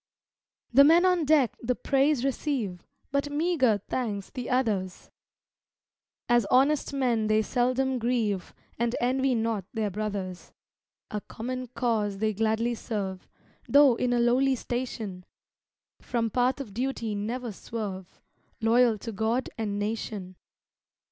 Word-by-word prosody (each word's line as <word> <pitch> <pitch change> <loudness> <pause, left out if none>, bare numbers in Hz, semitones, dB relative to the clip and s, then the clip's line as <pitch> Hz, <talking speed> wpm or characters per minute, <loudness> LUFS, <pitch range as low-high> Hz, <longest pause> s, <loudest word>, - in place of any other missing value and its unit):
The 275 +3 +8
men 330 +5 +6
on 360 -3 +3
deck 285 -5 +3
the 250 +1 0
praise 275 0 +2
receive, 250 - -2 0.2
But 280 +1 0
meagre 290 - +1
thanks 210 -6 -3
the 250 -4 -5
others; 210 -8 -1 1.2
As 240 -4 +3
honest 275 +4 +3
men 245 -6 +1
they 215 0 +3
seldom 255 +2 0
grieve, 225 -5 -1 0.2
And 235 0 0
envy 260 +1 +1
not 225 -4 -1
their 215 -2 -1
brothers; 200 -3 -5 0.6
A 210 - -3
common 255 +4 -5
cause 225 -5 -1
they 215 +1 0
gladly 225 +3 +1
serve, 200 -5 -4 0.4
Though 285 -2 +7
in 245 +1 -1
a 240 - +2
lowly 255 +3 +3
station, 230 -7 -4 0.8
From 230 -2 -1
path 255 +3 +1
of 225 -8 -7
duty 235 -2 -2
never 230 +4 -3
swerve 195 -3 -6 0.4
Loyal 230 0 +4
to 225 +3 -6
God 225 +5 -1
and 210 -3 -3
nation. 205 -3 -4
235 Hz, 130 wpm, -27 LUFS, 210-260 Hz, 1.2 s, The